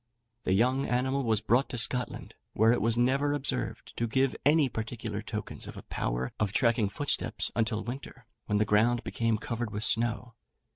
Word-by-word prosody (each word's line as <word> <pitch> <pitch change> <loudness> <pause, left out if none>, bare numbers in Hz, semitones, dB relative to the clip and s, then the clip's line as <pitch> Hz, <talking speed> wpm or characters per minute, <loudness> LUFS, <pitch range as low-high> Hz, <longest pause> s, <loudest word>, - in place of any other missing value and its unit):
The 95 - +2
young 125 +7 +2
animal 130 +3 0
was 110 -5 +1
brought 125 +5 +2
to 125 - -4
Scotland, 125 +1 +2 0.2
where 110 +2 +4
it 120 - +1
was 115 +1 +1
never 135 +4 +2
observed 125 -5 -2
to 115 - 0
give 130 +3 +1
any 150 0 +4
particular 110 -2 -5
tokens 110 -1 -5
of - - -9
a - - -9
power 60 +1 -3
of 105 -2 0
tracking 115 -3 +2
footsteps 145 +7 -1
until 110 -1 0
winter, 125 0 -8 0.2
when 105 - +1
the 105 - +2
ground 110 +3 +2
became 115 -1 0
covered 115 +1 -4
with 105 +1 -4
snow. 115 +1 -1
120 Hz, 180 wpm, -29 LUFS, 110-130 Hz, 0.2 s, where